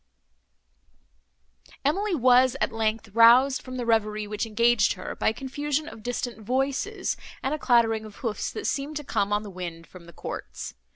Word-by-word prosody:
She 380 +6 +1
was, 255 -1 +4
at - - 0
length, 225 0 -1
roused 235 +5 +6
from 255 0 -7
the 245 - -3
reverie 215 -2 +1
which 210 +2 -3
engaged 230 0 +3
her, - - -7
by - - +1
a - - -2
confusion 290 +3 -3
of 220 - -10
distant 240 -1 -4
voices, 270 - -1 0.3
and 265 - 0
a 305 - -2
clattering 225 -4 +3
of 210 -2 -11
hoofs, 225 -2 -3
that 435 - -5
seemed 285 +2 -2
to 295 - -5
come, 200 -6 -1
on 205 +1 +1
the 205 - -8
wind, 170 -2 -7
from 180 -1 -14
the 170 - -13
courts. - - -7
235 Hz, 175 wpm, -26 LUFS, 215-270 Hz, 0.3 s, roused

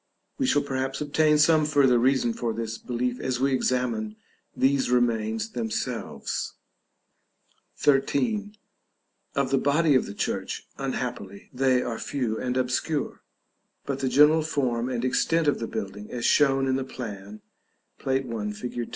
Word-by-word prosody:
We 265 - +1
shall 145 - +3
perhaps 135 -1 -2
obtain 150 +1 +3
some 155 +1 +5
further 140 -5 +4
reason 130 -1 +2
for 115 0 -2
this 115 -1 -4
belief 125 0 -2
as 130 -1 -2
we 135 +1 +2
examine 120 -5 0 0.4
these 135 -1 +2
remains 110 -3 +1
themselves. 115 -3 -3 1.2
§ 135 -2 +3
XIII. 210 - -1 0.8
Of 140 -1 0
the 135 - +3
body 150 +3 +3
of 130 - +2
the 100 - -8
church, 95 -1 -3
unhappily, 125 -7 -5
they 130 -1 +2
are 115 -2 -4
few 120 -6 -2
and 125 0 -2
obscure; 130 +4 -1 0.6
but 140 -1 -3
the 130 - 0
general 150 +5 +6
form 130 -6 -1
and 125 -1 -2
extent 165 +5 +1
of 145 - +2
the 115 - -3
building, 100 +2 -6
as 120 -1 -4
shown 135 -2 +4
in 130 0 +1
the 135 - -2
plan, 105 -5 -8 0.6
Plate 135 0 0
I. 110 -3 -3
fig. 120 +2 -5
130 Hz, 150 wpm, -26 LUFS, 115-140 Hz, 1.2 s, general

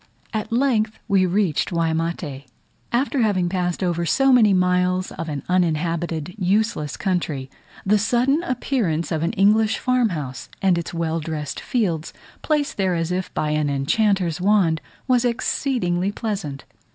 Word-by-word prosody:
At 215 0 -3
length 230 -3 +1
we 190 -2 +3
reached 185 -2 0
Waimate. 165 -4 -2 0.5
After 260 +2 +1
having 190 -5 +1
passed 180 0 -1
over 170 -1 0
so 270 +10 +3
many 225 -5 +6
miles 180 0 +2
of 165 - -5
an 145 -2 -4
uninhabited 170 -1 0
useless 190 -5 0
country, 155 -8 -2 0.3
the 210 +2 +3
sudden 245 +8 +2
appearance 240 - -1
of 160 -2 0
an 165 - 0
English 215 +3 +3
farm 255 -2 +2
house, 140 -7 -5
and 190 -2 +3
its 170 - -5
well 165 -1 -1
dressed 150 -2 -4
fields, 175 -10 -1 0.3
placed 295 -2 0
there 190 -3 +1
as 165 +1 -1
if 185 +1 -2
by 150 - 0
an 150 -1 +1
enchanter's 180 +4 +1
wand, 185 -5 +3 0.3
was 250 -2 +3
exceedingly 230 -6 0
pleasant. 200 - -4
180 Hz, 145 wpm, -22 LUFS, 165-220 Hz, 0.5 s, many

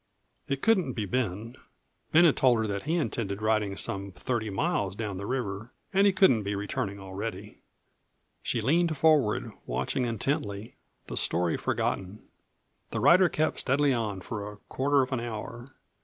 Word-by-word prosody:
It 140 -1 -2
couldn't 185 - +3
be 110 -4 -2
Ben. 115 +2 -2 0.5
Ben 165 +3 +7
had 160 - +5
told 125 -3 +4
her 110 - 0
that 100 +4 -4
he 165 - +1
intended 105 - -2
riding 110 -2 0
some 100 0 -3
thirty 110 +3 -2
miles 100 - -1
down 105 -3 -4
the 100 - -5
river 110 -4 -3 0.2
and 195 +1 +5
he - - +5
couldn't 190 - +4
be 100 0 -2
returning 100 0 -3
already. 100 +1 -6 0.8
She 115 - -1
leaned 160 +6 +2
forward, 145 -7 +3 0.2
watching 90 - -1
intently, 110 -3 -2 0.3
the - - -6
story 85 -1 +1
forgotten. 95 +3 -2 0.7
The - - -3
rider 180 +1 +6
kept 155 +1 0
steadily 140 +1 +2
on 105 -5 -2
for 105 +1 -5
a 105 - -13
quarter 140 +1 +2
of 130 - -6
an 130 - 0
hour. 120 +2 -6
115 Hz, 160 wpm, -28 LUFS, 100-140 Hz, 0.8 s, Ben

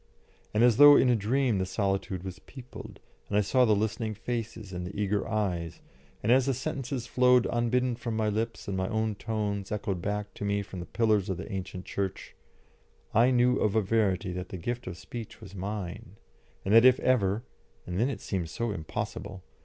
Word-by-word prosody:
And 105 +2 +2
as 120 -3 +5
though 145 0 +10
in 130 - +4
a 120 - +5
dream 115 +1 +1
the 95 - 0
solitude 95 -2 -1
was 95 0 -7
peopled, 125 +4 -11 0.3
and 100 - +1
I - - +5
saw 125 +5 +3
the 110 -2 +4
listening 110 +1 -1
faces 110 -3 -5
and 90 0 -4
the 100 +2 -7
eager 105 0 0
eyes, 90 -7 -2 0.4
and 110 - +2
as 130 +1 +4
the 135 - +1
sentences 130 -1 -3
flowed 125 0 +4
unbidden 120 +1 +1
from 115 -1 -4
my 110 -1 +1
lips 110 +2 -2
and 100 - -2
my 95 0 -1
own 110 0 0
tones 105 -2 -3
echoed 100 -4 -2
back 105 +2 -3
to - - -7
me 100 0 0
from 95 -1 -8
the 85 - -7
pillars 110 -4 +1
of 95 - -1
the 95 - -7
ancient 95 -1 -5
church, 95 -1 -4 0.8
I 120 +4 +5
knew 125 0 +3
of 105 0 +1
a 110 - +4
verity 95 -4 +1
that 90 0 -5
the 95 - -6
gift 120 +8 -4
of 90 -2 -5
speech 115 +2 -8
was 105 -4 -12
mine, 100 +2 -5 0.5
and 100 - +1
that 115 +1 +8
if 130 0 +6
ever 110 -3 +2 0.4
and 90 +1 -3
then 120 +4 +2
it 140 - -5
seemed 90 -5 -3
so 115 +8 -2
impossible! 95 +2 -5
105 Hz, 200 wpm, -29 LUFS, 95-120 Hz, 0.8 s, though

